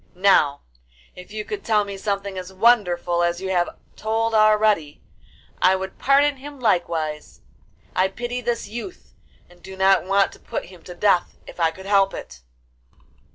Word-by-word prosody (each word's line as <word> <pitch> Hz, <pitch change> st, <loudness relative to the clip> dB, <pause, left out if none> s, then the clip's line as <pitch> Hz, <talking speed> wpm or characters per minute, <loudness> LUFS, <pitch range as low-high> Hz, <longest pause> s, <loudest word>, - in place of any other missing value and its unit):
Now, 180 Hz, -7 st, +3 dB, 0.5 s
if 180 Hz, +2 st, -12 dB
you 215 Hz, 0 st, -5 dB
could 415 Hz, -1 st, -6 dB
tell 215 Hz, -2 st, +2 dB
me 200 Hz, -1 st, -6 dB
something 200 Hz, 0 st, -3 dB
as 185 Hz, 0 st, -7 dB
wonderful 185 Hz, -5 st, +2 dB
as 175 Hz, 0 st, 0 dB
you 190 Hz, 0 st, -4 dB
have 175 Hz, -2 st, +1 dB, 0.3 s
told 225 Hz, +1 st, -1 dB
already, 215 Hz, -7 st, +3 dB, 0.6 s
I 185 Hz, +1 st, +5 dB
would 190 Hz, 0 st, -6 dB
pardon 280 Hz, +1 st, +3 dB
him 285 Hz, +1 st, -10 dB
likewise; 165 Hz, -8 st, -1 dB, 0.5 s
I 185 Hz, +1 st, +3 dB
pity 240 Hz, +5 st, -5 dB
this 235 Hz, -2 st, -2 dB
youth 240 Hz, -, -9 dB, 0.3 s
and 175 Hz, 0 st, -21 dB
do 190 Hz, 0 st, -10 dB
not 190 Hz, 0 st, +4 dB
want 195 Hz, +1 st, +2 dB
to -, -, -15 dB
put -, -, -5 dB
him 180 Hz, -1 st, -15 dB
to 180 Hz, -, -9 dB
death 180 Hz, -1 st, +1 dB
if -, -, -12 dB
I 165 Hz, -1 st, +3 dB
could 190 Hz, +4 st, -11 dB
help 195 Hz, -1 st, +3 dB
it. 65 Hz, 0 st, -10 dB
195 Hz, 165 wpm, -22 LUFS, 180-220 Hz, 0.6 s, I